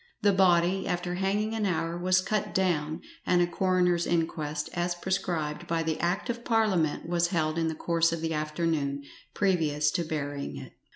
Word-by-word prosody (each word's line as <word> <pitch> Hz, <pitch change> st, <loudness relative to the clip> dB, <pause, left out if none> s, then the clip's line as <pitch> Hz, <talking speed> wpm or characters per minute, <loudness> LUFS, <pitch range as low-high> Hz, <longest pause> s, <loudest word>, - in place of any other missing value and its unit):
The 205 Hz, -1 st, +5 dB
body, 185 Hz, 0 st, +3 dB
after 175 Hz, 0 st, -2 dB
hanging 200 Hz, +4 st, 0 dB
an 215 Hz, -2 st, 0 dB
hour, 165 Hz, -2 st, -1 dB
was 185 Hz, +1 st, +2 dB
cut 210 Hz, +2 st, -2 dB
down, 160 Hz, -4 st, 0 dB, 0.2 s
and 180 Hz, -, +3 dB
a 175 Hz, -, +4 dB
coroner's 180 Hz, -1 st, +1 dB
inquest, 155 Hz, -3 st, -1 dB
as 175 Hz, 0 st, -1 dB
prescribed 175 Hz, -5 st, -2 dB
by 165 Hz, -1 st, 0 dB
the 160 Hz, -1 st, -2 dB
Act 175 Hz, +6 st, 0 dB
of 235 Hz, -1 st, -3 dB
Parliament, 200 Hz, -11 st, +1 dB
was 175 Hz, 0 st, +2 dB
held 160 Hz, -2 st, 0 dB
in 165 Hz, -, +1 dB
the 160 Hz, -, -2 dB
course 165 Hz, +1 st, +1 dB
of 165 Hz, -1 st, -3 dB
the 160 Hz, 0 st, -1 dB
afternoon, 150 Hz, -2 st, -1 dB, 0.3 s
previous 155 Hz, -6 st, +2 dB
to 170 Hz, -, 0 dB
burying 145 Hz, -, -4 dB
it. -, -, -9 dB
170 Hz, 175 wpm, -28 LUFS, 155-185 Hz, 0.3 s, The